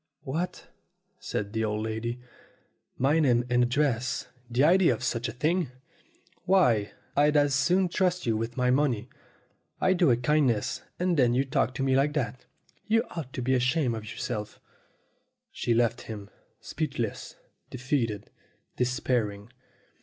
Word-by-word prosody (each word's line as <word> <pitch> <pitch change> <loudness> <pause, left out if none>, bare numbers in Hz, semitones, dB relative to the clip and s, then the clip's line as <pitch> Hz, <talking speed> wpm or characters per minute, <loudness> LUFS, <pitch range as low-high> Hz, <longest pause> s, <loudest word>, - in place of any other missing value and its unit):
"What?" 160 +6 -4 0.5
said 100 +1 -4
the 110 0 0
old 105 0 -1
lady. 110 +2 -3 0.8
"My 145 +5 +3
name 125 -5 +3
and 125 0 +4
ad - - -3
dress? 125 -3 0 0.2
The 125 +3 +2
idea 180 +3 +5
of - - -9
such 120 -1 -1
a - - -4
thing! 160 +6 0 0.8
Why, 125 - +3 0.2
I'd 150 +1 +4
as 145 -1 +3
soon 180 +8 +3
trust 180 0 0
you 115 -2 +1
with 115 +2 -3
my 125 0 +2
money. 130 -4 +1 0.7
I 185 - +3
do 175 -4 +3
a 120 - +4
kindness, 125 -4 +1 0.2
and 180 -1 +1
then 120 -3 +4
you 135 +2 +2
talk 130 -1 0
to 135 - -2
me 135 -1 +2
like 140 +2 +2
that. 130 -4 -3 0.4
You 225 +1 +3
ought 155 -7 -6
to 125 - -4
be 130 +2 +1
ashamed' 130 +1 +2
of 110 -1 -7
yourself." 105 -3 -5 0.9
She 120 - 0
left 120 0 +1
him 105 -3 -8 0.3
speechless, 135 -9 -4 0.3
defeated, 125 -5 -2 0.5
despairing. 120 -4 -1
125 Hz, 150 wpm, -28 LUFS, 115-150 Hz, 0.9 s, idea